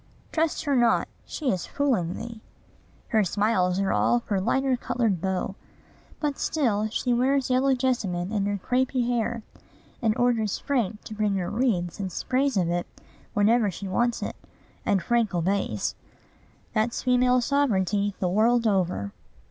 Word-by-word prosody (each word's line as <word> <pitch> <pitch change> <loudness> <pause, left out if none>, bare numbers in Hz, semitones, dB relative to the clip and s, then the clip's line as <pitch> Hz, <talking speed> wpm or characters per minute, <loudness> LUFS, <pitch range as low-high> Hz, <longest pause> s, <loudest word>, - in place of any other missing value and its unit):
"Trust 320 -1 0
her 285 -2 +2
not: 240 -2 +3 0.2
she 285 -5 -1
is 185 - -3
fooling 235 - 0
thee." 230 -1 -7 0.7
Her 220 -3 +3
smiles 190 -1 +1
are 195 -1 +1
all 240 - +3
for 200 -5 -2
lighter 265 +6 +1
colored 225 -7 -1
beaux. 190 +1 -1 0.7
But 295 -2 -2
still 220 -9 +1
she 245 +2 0
wears 260 +2 +2
yellow 265 +1 +3
jessamine 210 -8 -1
in 200 -2 0
her 205 0 -1
crapy 255 0 +1
hair, 235 -1 -1 0.6
and 225 -1 +1
orders 235 -4 +1
Frank 225 -7 -1
to - - -8
bring 210 -2 0
her 180 -2 -2
wreaths 205 -8 0
and 190 -2 -3
sprays 260 +6 0
of 180 -3 +2
it 175 0 -1 0.5
whenever 215 +1 +4
she 195 +2 -6
wants 240 +5 0
it; - - -4 0.5
and 195 -3 +2
Frank 235 -5 +1
obeys. 175 - 0 0.8
That's 220 +2 0
female 250 0 +4
sovereignty, 205 -7 +1
the 185 - 0
world 230 +5 +3
over! 180 - 0
220 Hz, 150 wpm, -26 LUFS, 195-250 Hz, 0.8 s, whenever